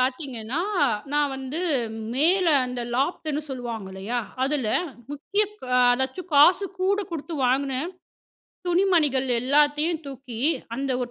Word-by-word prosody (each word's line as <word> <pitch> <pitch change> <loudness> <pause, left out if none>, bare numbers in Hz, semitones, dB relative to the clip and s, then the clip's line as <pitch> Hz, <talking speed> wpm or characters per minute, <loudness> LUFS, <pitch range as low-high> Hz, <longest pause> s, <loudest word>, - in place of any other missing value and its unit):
பார்த்தீங்கன்னா, 255 -1 -2 0.5
நான் 295 -1 +2
வந்து 265 +4 -5 0.5
மேல 350 +7 +3 0.2
அந்த 250 -1 -5
லாப்ட்டுன்னு 300 +2 -1
சொல்லுவாங்க 240 -5 -5
இல்லையா? 200 +6 -3 0.3
அதில 275 -3 0 0.5
முக்கிய 365 +9 0
ப் 420 - -14 0.3
அதாச்சும் 265 +8 -2
காசு 335 +8 +6 0.2
கூட 390 +2 +2
கொடுத்து 325 +1 -5
வாங்கின 265 +1 +1 0.9
துணிமணிகள் 330 -8 +2
எல்லாத்தையும் 295 +5 +2
தூக்கி, 260 -4 -7 0.4
அந்த 275 +1 -2
ஒரு 245 - -5
280 Hz, 115 wpm, -25 LUFS, 255-320 Hz, 0.9 s, காசு